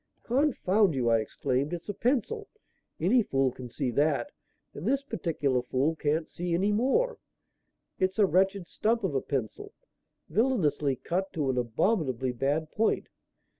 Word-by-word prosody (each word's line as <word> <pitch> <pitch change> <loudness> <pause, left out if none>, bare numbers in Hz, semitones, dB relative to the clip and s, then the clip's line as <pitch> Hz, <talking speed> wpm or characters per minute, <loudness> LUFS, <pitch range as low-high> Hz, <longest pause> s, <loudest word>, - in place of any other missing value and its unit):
"Confound 220 - +2
you!" 125 -3 +1
I 115 -1 +4
exclaimed. 130 +7 -1
"It's 175 -1 -5
a 205 - -2
pencil. 290 - 0 0.5
Any 210 +10 +4
fool 135 - +1
can 125 0 -9
see 130 +1 -2
that, 150 - +1 0.4
and - - -6
this 275 0 +1
particular 145 - -1
fool 130 +6 0
can't 155 +1 0
see 175 -1 -2
any 195 +4 +2
more. 270 - +1 0.8
It's 185 0 +1
a 210 - +6
wretched 190 0 +2
stump 225 +4 0
of 185 -6 0
a 135 - +1
pencil, 130 -7 -4 0.5
villainously 155 - +1
cut 185 +8 -2
to 145 -4 0
an 125 - -3
abominably 130 - 0
bad 145 +5 -1
point. 220 +1 0
165 Hz, 150 wpm, -28 LUFS, 135-215 Hz, 0.8 s, a